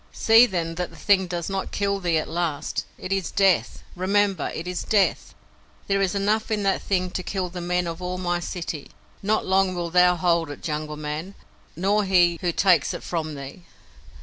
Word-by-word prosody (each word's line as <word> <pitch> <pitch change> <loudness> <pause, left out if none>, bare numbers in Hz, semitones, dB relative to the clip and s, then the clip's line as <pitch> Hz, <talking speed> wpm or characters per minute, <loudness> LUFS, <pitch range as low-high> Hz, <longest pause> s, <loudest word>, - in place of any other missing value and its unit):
"See, 225 +2 +6
then, 170 -4 -2
that 180 - -3
the - - -16
thing 190 -2 +2
does 175 -1 -4
not 195 -1 -3
kill 200 -1 0
thee 175 -3 +1
at 155 - -2
last. 165 -3 -2
It 185 - -3
is 195 -2 -1
Death! 195 -3 +2
Remember, 195 -1 +1
it 160 - -5
is 180 0 -3
Death! 205 -3 +1 0.5
There 195 0 +1
is 195 0 0
enough 210 +3 0
in 215 -2 0
that 195 -1 +1
thing 185 -2 -1
to 185 - -3
kill 185 0 -3
the 180 0 -7
men 180 0 0
of 165 +1 -5
all 180 0 -3
my 175 -1 -1
city. 170 -4 -5 0.3
Not 215 +2 0
long 190 -1 +2
wilt 170 -1 -4
thou 180 0 +5
hold 170 -2 +1
it, 145 - -9
Jungle 150 -1 -3
Man, 155 +6 -5 0.4
nor 200 +5 +1
he 175 -3 +3
who 175 - +1
takes 175 -3 +3
it - - -8
from 155 -3 -3
thee. 140 +5 -9
180 Hz, 200 wpm, -24 LUFS, 170-195 Hz, 0.5 s, See